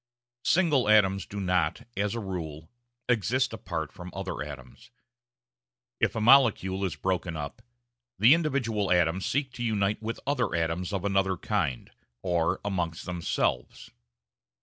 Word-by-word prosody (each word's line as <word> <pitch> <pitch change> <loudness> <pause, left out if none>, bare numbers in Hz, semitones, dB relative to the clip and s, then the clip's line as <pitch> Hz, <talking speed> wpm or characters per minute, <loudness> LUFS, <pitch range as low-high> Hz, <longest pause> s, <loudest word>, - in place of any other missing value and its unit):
Single 150 - +3
atoms 100 -3 +4
do 100 - -6
not, 90 -5 0
as 100 +2 -1
a - - -2
rule, 80 -6 -6 0.4
exist 125 +2 +1
apart 80 -8 -4
from 90 0 -9
other 95 -6 -4
atoms; 70 -4 -9 1.1
if - - +1
a - - -1
molecule 110 -6 +4
is 95 - -1
broken 90 -3 -2
up, 75 +9 -6 0.6
the 115 +7 +7
individual 125 - 0
atoms 90 +1 +2
seek 135 -1 -1
to 120 - -5
unite 105 -2 0
with 115 +2 -4
other 140 -9 0
atoms 85 +3 -1
of 100 -1 -2
another 95 -2 +1
kind 65 -5 -2 0.3
or 85 -2 +1
amongst 85 -5 -2
themselves. 85 -8 -2
95 Hz, 135 wpm, -28 LUFS, 85-115 Hz, 1.1 s, the